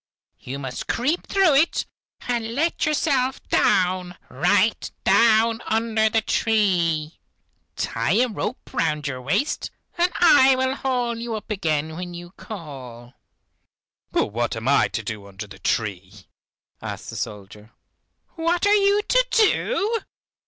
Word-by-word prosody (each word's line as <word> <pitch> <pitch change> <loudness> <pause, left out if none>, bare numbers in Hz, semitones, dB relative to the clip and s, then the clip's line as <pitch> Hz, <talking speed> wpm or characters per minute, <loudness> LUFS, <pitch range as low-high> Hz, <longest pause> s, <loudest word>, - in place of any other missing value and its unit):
You 135 +2 -6
must 130 -2 -6
creep 285 +9 -1
through 385 -6 +3
it 300 +5 +2 0.4
and 235 -2 -3
let 325 +2 0
yourself 275 -4 +1
down, 180 -1 +1
right - - +1
down 230 0 +4
under 220 -1 +1
the 225 0 +1
tree. 175 -10 +1 0.6
Tie 115 +8 -1
a 250 +3 +3
rope 240 +3 -5
round 150 -2 0
your 130 -2 -4
waist, 145 - -1 0.3
and 350 +1 +3
I 270 -6 +6
will 260 0 0
haul 245 -4 -2
you 230 -1 -4
up 215 +1 -7
again 160 -5 -1
when 175 0 -6
you 175 0 -9
call." 130 - -10 1.0
"But - - 0
what 120 +1 -1
am 115 +2 -5
I 140 +1 +4
to 105 +4 -4
do 105 -2 -6
under 100 +2 -8
the 100 -1 -13
tree?" 95 -1 -3 0.6
asked - - -6
the - - -8
soldier. 105 +1 -7 0.6
"What 340 +2 0
are 410 - +5
you 405 0 +3
to - - +3
do? 450 0 +2
215 Hz, 140 wpm, -23 LUFS, -, 1.0 s, I